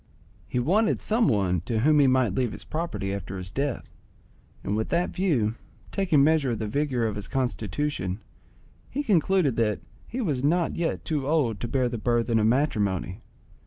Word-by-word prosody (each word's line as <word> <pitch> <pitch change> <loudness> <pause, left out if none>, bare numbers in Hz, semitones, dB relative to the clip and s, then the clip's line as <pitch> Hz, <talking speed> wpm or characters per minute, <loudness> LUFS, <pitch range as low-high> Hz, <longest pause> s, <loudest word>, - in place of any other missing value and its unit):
He - - -3
wanted 195 - +2
some 225 +2 +2
one 95 - +1
to 110 -2 0
whom 150 +3 +4
he 140 - +6
might 130 -6 +3
leave 120 +1 0
his - - -9
property 155 -12 -3
after 95 -1 -5
his 90 0 -7
death, 140 +1 -2 0.8
and 100 - -1
with 110 +1 -1
that 170 +1 +1
view, 140 - +1 0.4
taking 175 -8 +3
measure 155 -3 +3
of 115 - -1
the 110 - -3
vigour 130 0 0
of 110 -2 -1
his 105 - -5
constitution, 120 -5 -2 0.7
he 285 +3 -2
concluded 185 - +2
that 105 -3 +1 0.3
he 250 - -5
was 145 - -1
not 170 +3 +2
yet 170 -1 -2
too 145 -4 -1
old 140 -10 +1
to 120 - -3
bear 130 +1 +1
the 120 -2 -4
burthen 115 0 +1
of 110 - +3
matrimony. 105 - 0
130 Hz, 180 wpm, -26 LUFS, 110-155 Hz, 0.8 s, he